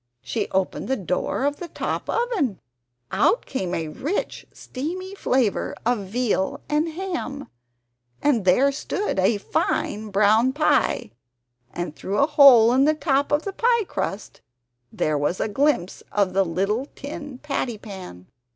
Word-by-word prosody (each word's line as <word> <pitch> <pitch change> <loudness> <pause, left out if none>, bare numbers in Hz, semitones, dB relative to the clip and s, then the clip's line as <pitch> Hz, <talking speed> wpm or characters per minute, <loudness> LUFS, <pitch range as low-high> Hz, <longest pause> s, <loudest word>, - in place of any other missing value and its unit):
She 215 -3 -2
opened 190 0 -1
the 265 - +1
door 185 +6 -2
of 290 0 0
the 350 - -6
TOP - - -4
oven; 415 - 0 0.5
out 480 - +2
came 185 -9 -3
a 160 -1 -2
rich 300 - -3
steamy 360 +8 -6
flavour 255 - 0
of 230 -5 0
veal 215 -2 0
and 300 +2 +1
ham, 330 -5 -5 0.7
and 270 -8 +2
there 220 +10 +4
stood 300 - -2
a 200 +3 +3
fine 210 +1 -1
brown 215 +5 +3
pie, 295 - +1 0.6
and 175 -3 -5
through 200 +2 -3
a 280 - +5
hole 265 -6 +7
in 265 +2 +4
the 310 +1 +3
top 285 -2 +1
of 295 +1 +2
the 395 - -4
pie 470 +1 +2
crust 210 - -5 0.5
there 150 -1 0
was 145 +5 -1
a - - 0
glimpse 270 -4 0
of 195 -3 +1
a 195 - +4
little 195 +8 -1
tin 290 -1 -7
patty 260 -5 -3
pan! 185 - -10
250 Hz, 150 wpm, -23 LUFS, 195-295 Hz, 0.7 s, hole